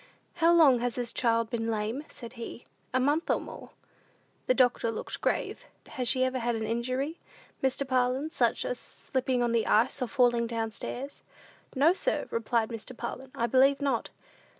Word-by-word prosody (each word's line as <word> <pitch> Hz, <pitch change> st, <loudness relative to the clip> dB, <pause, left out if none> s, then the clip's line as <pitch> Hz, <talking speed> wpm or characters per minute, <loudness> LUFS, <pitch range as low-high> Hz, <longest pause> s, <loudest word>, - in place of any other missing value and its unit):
"How 335 Hz, 0 st, +5 dB
long 300 Hz, -8 st, +6 dB
has 245 Hz, 0 st, -1 dB
this 245 Hz, -2 st, -2 dB
child 230 Hz, -2 st, +1 dB
been 230 Hz, -1 st, -1 dB
lame?" 220 Hz, +5 st, -2 dB
said 235 Hz, -1 st, -10 dB
he. 235 Hz, 0 st, -8 dB, 0.3 s
"A 255 Hz, -, +2 dB
month 290 Hz, +6 st, +1 dB
or -, -, +3 dB
more." -, -, -10 dB, 0.8 s
The 255 Hz, -, +3 dB
doctor 245 Hz, -2 st, +3 dB
looked 225 Hz, -, -5 dB
grave. -, -, -1 dB, 0.2 s
"Has 250 Hz, -2 st, -2 dB
she 255 Hz, +1 st, +3 dB
ever 260 Hz, 0 st, 0 dB
had 240 Hz, 0 st, 0 dB
an 220 Hz, -, -3 dB
injury, 255 Hz, +7 st, -2 dB, 0.4 s
Mr. 265 Hz, +1 st, 0 dB
Parlin, 260 Hz, +4 st, +1 dB
such -, -, +1 dB
as -, -, -3 dB
slipping 255 Hz, -1 st, -2 dB
on 240 Hz, -, +1 dB
the 230 Hz, -1 st, +1 dB
ice, 240 Hz, +5 st, +3 dB
or 250 Hz, -, 0 dB
falling 240 Hz, -3 st, +2 dB
down 225 Hz, -1 st, -2 dB
stairs?" 265 Hz, +5 st, -6 dB, 0.5 s
"No, 295 Hz, +6 st, +5 dB
sir," -, -, -1 dB
replied 230 Hz, 0 st, 0 dB
Mr. 230 Hz, +1 st, -7 dB
Parlin, 255 Hz, +2 st, -6 dB
"I 235 Hz, -, 0 dB
believe 265 Hz, +4 st, +4 dB
not." 275 Hz, -5 st, -1 dB
250 Hz, 175 wpm, -29 LUFS, 230-270 Hz, 0.8 s, long